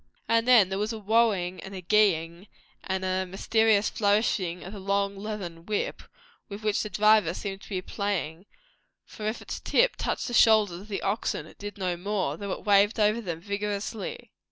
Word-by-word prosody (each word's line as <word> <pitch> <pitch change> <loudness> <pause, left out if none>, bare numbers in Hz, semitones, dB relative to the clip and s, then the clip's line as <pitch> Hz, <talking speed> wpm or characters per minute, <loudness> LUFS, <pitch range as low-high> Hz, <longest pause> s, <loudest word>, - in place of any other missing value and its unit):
And 230 +1 +2
then 230 -7 +6
there 190 0 -2
was 210 +2 -1
a 225 - -4
"whoa" 225 +2 +3
ing 180 -2 -4
and 195 0 -9
a 185 - -6
"gee" 210 0 +4
ing 170 +4 -9 0.4
and 190 0 -2
a 185 0 0
mysterious 210 +3 +2
flourishing 200 -4 0
of 190 - -8
the 205 - -7
long 200 +1 0
leathern 195 -5 -6
whip, 210 -1 -2 0.5
with 205 +1 -8
which 210 -1 +1
the 215 - -4
driver 210 -3 +4
seemed 195 -1 -5
to - - -13
be 185 -3 -3
playing; 195 -3 -3 0.6
for 215 - -7
if 215 - -3
its - - -6
tip - - +2
touched - - -2
the 240 - -5
shoulders 215 -7 +4
of 205 - -13
the 205 -2 -4
oxen 195 -6 -1
it - - -17
did 205 +1 -7
no 180 -3 -2
more, 185 -5 -2
though 200 +3 -5
it - - -5
waved 205 +2 +4
over 215 +2 +3
them 170 -6 -5
vigorously. 205 +3 -4
200 Hz, 200 wpm, -27 LUFS, 185-215 Hz, 0.6 s, then